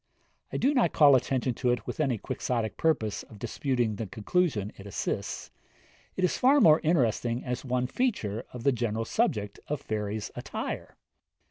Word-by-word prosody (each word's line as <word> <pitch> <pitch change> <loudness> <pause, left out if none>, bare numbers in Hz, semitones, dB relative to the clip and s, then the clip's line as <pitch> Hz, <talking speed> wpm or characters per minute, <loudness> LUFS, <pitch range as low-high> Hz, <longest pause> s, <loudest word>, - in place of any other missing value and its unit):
I - - -2
do 275 +3 +2
not 245 - +2
call 145 -3 +7
attention 130 0 +1
to 125 +2 -1
it 120 - 0
with - - -5
any 135 -6 +1
Quixotic 110 0 -2
purpose 140 -10 0
of 110 - -14
disputing 120 -1 -1
the 110 - -4
conclusion 110 - 0
it 100 - -11
assists; 100 - -3 0.6
it 185 - -2
is 180 - +1
far 275 +3 +5
more 160 - +7
interesting 125 -6 +1
as 125 -1 -3
one 125 -1 0
feature 125 - -1
of 120 -2 -8
the 140 - +4
general 115 -2 -1
subject 105 -2 0
of 150 -1 -2
fairies' 105 -1 -3
attire. - - -5
125 Hz, 165 wpm, -28 LUFS, 110-150 Hz, 0.6 s, call